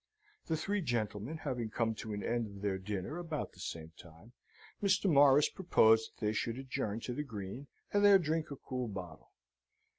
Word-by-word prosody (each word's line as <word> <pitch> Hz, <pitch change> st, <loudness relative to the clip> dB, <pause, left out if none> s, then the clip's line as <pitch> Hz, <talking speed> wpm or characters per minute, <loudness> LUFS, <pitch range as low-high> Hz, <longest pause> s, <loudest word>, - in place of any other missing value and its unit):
The 160 Hz, -, 0 dB
three 200 Hz, +6 st, -1 dB
gentlemen 115 Hz, -, -2 dB
having 125 Hz, -6 st, -2 dB
come 115 Hz, 0 st, 0 dB
to 110 Hz, 0 st, -7 dB
an 105 Hz, -1 st, -4 dB
end 120 Hz, -1 st, 0 dB
of 100 Hz, -1 st, -11 dB
their 95 Hz, -2 st, 0 dB
dinner 100 Hz, -, -4 dB
about 160 Hz, -4 st, -4 dB
the -, -, -18 dB
same 80 Hz, -1 st, -6 dB
time, 85 Hz, +7 st, -15 dB, 0.5 s
Mr. 200 Hz, 0 st, +3 dB
Morris 145 Hz, -3 st, +6 dB
proposed 110 Hz, -, +3 dB
that 110 Hz, -, -4 dB
they 105 Hz, -, +2 dB
should 115 Hz, +2 st, -2 dB
adjourn 130 Hz, -5 st, -3 dB
to 125 Hz, -, -4 dB
the 150 Hz, -, -2 dB
Green, 115 Hz, 0 st, -6 dB, 0.3 s
and 205 Hz, 0 st, +3 dB
there 200 Hz, -1 st, +9 dB
drink 160 Hz, -2 st, -1 dB
a 140 Hz, -, -5 dB
cool 125 Hz, -2 st, -4 dB
bottle. 90 Hz, -6 st, -8 dB
120 Hz, 185 wpm, -34 LUFS, 105-150 Hz, 0.5 s, there